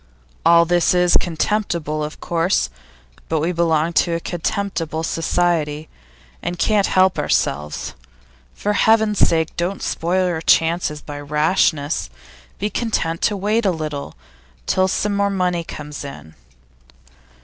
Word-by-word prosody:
All 170 0 +6
this 175 +1 +2
is 180 0 +4
contemptible, 170 -3 0
of 150 +1 -6
course; 170 - 0 0.6
but - - +1
we 165 +4 0
belong 165 -1 +1
to 170 +1 +2
a - - -1
contemptible 170 -2 -3
society, 160 -2 0 0.5
and 175 - -3
can't 205 +1 +2
help 185 0 +3
ourselves. 75 -5 -1 0.6
For 210 - -1
Heaven's 220 -1 +3
sake, 160 -1 +2
don't 180 +3 -2
spoil 180 +2 0
your 165 -3 -2
chances 165 -2 +2
by 145 -1 -7
rashness; 150 - +1 0.5
be 205 - -1
content 165 -8 -1
to 205 - +1
wait 210 +4 +1
a 200 - +3
little, 155 -4 -4 0.5
till 185 - +2
some 205 +2 0
more 200 0 +2
money 180 -3 0
comes 150 -2 -8
in. 80 - -10
170 Hz, 130 wpm, -20 LUFS, 155-185 Hz, 0.6 s, All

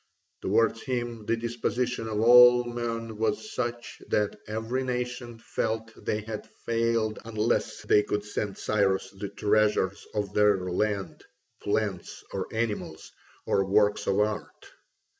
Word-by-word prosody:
Towards 115 +3 +2
him 120 -4 -3
the 115 - +2
disposition 120 +1 -2
of 105 -1 -1
all 125 +1 +8
men 115 -2 -4
was 210 - -1
such 120 -1 -4
that 105 -1 +1
every 110 +4 -2
nation 125 -1 -3
felt 115 0 -3
they 110 - -2
had 110 0 -6 0.2
failed 115 -2 +1
unless 110 +1 -1
they 105 - +5
could 105 0 -2
send 105 -1 -3
Cyrus 95 -2 +1
the 100 +1 -6
treasures 105 -1 +1
of 105 -2 -2
their 105 -1 +4
land, 95 +2 -2 0.4
plants, 100 -3 -2
or 95 -1 -2
animals, 110 -2 -3 0.3
or 95 - +2
works 105 +1 +2
of 100 +1 +2
art. 105 0 -3
110 Hz, 130 wpm, -27 LUFS, 105-120 Hz, 0.4 s, all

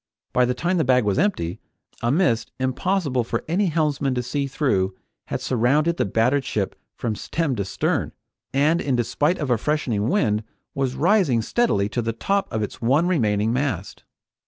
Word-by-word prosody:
By 125 - +4
the 125 0 -1
time 175 +7 0
the 160 - +3
bag 125 -1 +3
was 105 +5 +1
empty, 160 - 0 0.4
a 120 - +1
mist 120 -8 +1
impossible 130 +1 0
for 115 0 -3
any 185 +5 +1
helmsman 150 -5 0
to 125 - -1
see 140 +3 -2
through 100 -10 0 0.3
had - - -3
surrounded 145 +8 +2
the - - +1
battered 120 +7 +2
ship 105 -6 -2 0.2
from 115 - -2
stem 150 +5 -2
to 100 - -1
stern, - - -1 0.4
and 150 +5 +2
in 135 -3 0
despite 145 +8 +1
of 145 -5 -2
a 120 - +2
freshening 120 -7 0
wind, 110 - +1 0.3
was 135 -2 -1
rising 165 - +3
steadily 115 - +1
to 120 - -1
the 115 0 -2
top 195 - -1
of 110 -1 -1
its 105 - -6
one 140 +9 +3
remaining 110 - +1
mast. 125 -8 -2
130 Hz, 180 wpm, -23 LUFS, 115-155 Hz, 0.4 s, By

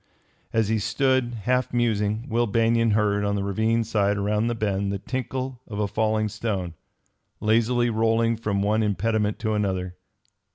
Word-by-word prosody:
As 110 -2 +1
he 110 -1 +1
stood, 120 +2 +1
half 125 +2 +1
musing, 110 -2 0
Will 120 -1 +1
Banion 115 +2 +2
heard, 105 -1 +1
on 100 0 0
the 100 - -1
ravine 110 +4 +1
side 105 -2 +1
around 105 +2 0
the 120 - -1
bend, 100 -2 -1
the 100 - -2
tinkle 130 +3 -4
of 105 - -6
a 105 -1 0
falling 110 +1 0
stone, 95 -5 -3 0.7
lazily 115 +2 +2
rolling 115 +1 +2
from 105 -3 -1
one 105 +2 +2
impediment 105 +1 0
to 110 -2 -1
another. 95 -3 -1
110 Hz, 160 wpm, -25 LUFS, 100-115 Hz, 0.7 s, Banion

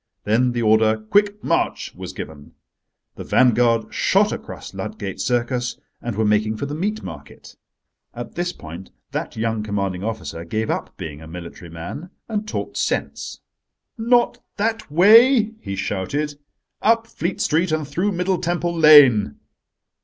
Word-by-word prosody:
Then 120 +4 +2
the 120 -1 -1
order 110 0 +4
"Quick 205 - +1
march!" - - -1
was - - -7
given. 75 -2 -9 0.6
The - - -6
vanguard 120 -2 +3
shot - - +3
across - - -7
Ludgate 95 -2 -5
Circus, 120 +2 -1 0.2
and 120 -3 -4
were 110 +1 +1
making 105 +1 +1
for 140 - -3
the 145 - -5
Meat 205 +7 -2
Market. 75 -5 -10 0.6
At 120 0 -7
this 175 0 -2
point 85 - -10 0.2
that - - -4
young 110 -1 -1
commanding 100 -3 -2
officer 90 -8 -4
gave 110 +6 -2
up - - -4
being 75 -1 -7
a 80 - -10
military 85 +1 -9
man 85 - -7 0.2
and 215 -1 -3
talked - - -4
sense. - - -2 0.5
"Not 240 +1 +2 0.2
that 220 -1 -1
way," 220 - +6
he 100 - -5
shouted: 105 +11 -2 0.5
"up 225 +1 +3
Fleet 180 -4 -4
Street 165 +2 +1
and 155 -2 -1
through 180 +8 0
Middle 180 0 0
Temple 175 0 -1
Lane." 145 - +7
120 Hz, 145 wpm, -21 LUFS, -, 0.6 s, Lane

